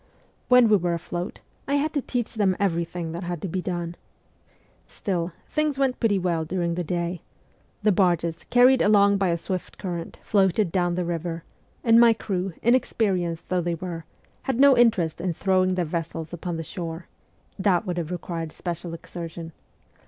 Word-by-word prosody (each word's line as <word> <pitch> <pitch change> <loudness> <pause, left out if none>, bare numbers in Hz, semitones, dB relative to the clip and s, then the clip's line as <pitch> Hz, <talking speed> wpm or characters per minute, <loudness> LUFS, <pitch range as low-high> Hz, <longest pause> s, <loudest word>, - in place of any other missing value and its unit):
When 250 -2 +7
we 210 -1 +5
were 175 -2 0
afloat, 175 +1 -5 0.3
I 280 - +1
had 300 +2 0
to 285 - 0
teach 245 -2 -3
them 200 -4 +2
everything 170 -3 -1
that 170 +2 -5
had 175 -2 -4
to - - -1
be 185 +2 -2
done. 175 -2 -3 0.9
Still, 180 -3 -3 0.2
things 305 -2 0
went 270 -2 +1
pretty 215 -4 +2
well 175 -3 0
during 170 +1 -1
the 175 +1 -2
day; 170 +1 -2 0.6
the 210 - +5
barges, 175 -3 +1
carried 250 +1 +6
along 200 -1 +5
by 195 -1 +1
a 170 - +1
swift 185 +2 -5
current, 175 -3 -5
floated 195 -2 +2
down 175 -1 +1
the 180 0 -1
river, 170 -1 -3 0.4
and 230 -1 +6
my 235 -1 +7
crew, 195 -4 -3
inexpe 230 -3 +2
rienced 170 -2 -3
though 180 -1 +1
they 170 0 -1
were, 165 -1 -6 0.4
had 260 -2 0
no 280 -1 +7
interest 185 -10 +3
in 180 -1 -1
throwing 185 0 +2
their 180 -1 0
vessels 165 0 -4
upon 175 0 -4
the 165 - -4
shore 165 -1 -6 0.5
that 190 0 +2
would 180 -2 -3
have 165 -2 -4
required 170 -2 -4
special 170 0 -5
exertion. 165 -1 -8
180 Hz, 175 wpm, -25 LUFS, 170-205 Hz, 0.9 s, When